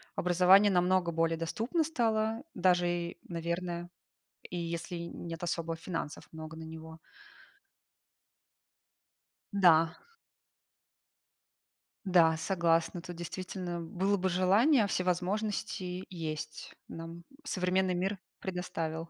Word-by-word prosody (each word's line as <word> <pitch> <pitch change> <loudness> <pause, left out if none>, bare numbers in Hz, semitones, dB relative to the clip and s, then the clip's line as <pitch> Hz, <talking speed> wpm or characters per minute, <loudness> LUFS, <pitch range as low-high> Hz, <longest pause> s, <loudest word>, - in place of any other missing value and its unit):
образование 185 +3 +6
намного 180 -1 +3
более 165 0 +1
доступно 230 - 0
стало, 225 -5 0
даже, 180 -2 +3
и, 175 0 -2
наверное, 170 +1 -3 0.6
и 180 - -5
если 170 +1 -3
нет 170 0 -6
особо 165 -1 -2
финансов 165 -2 -5
много 160 0 -8
на 160 - -7
него. 160 0 -9 2.5
Да. 165 -5 +6 2.2
Да, 165 -4 +5
согласна. 170 -1 +1
Тут, 175 +1 -8
действительно, 175 0 -5
было 190 +5 0
бы 190 0 0
желание, 205 - +4
а - - -2
все 185 - 0
возможности 185 0 -2
есть. 155 -3 -5
Нам 165 +1 -8 0.2
современный 185 -6 +1
мир 190 +3 -1 0.2
предоставил. 165 -3 -4
175 Hz, 100 wpm, -31 LUFS, 165-190 Hz, 2.5 s, образование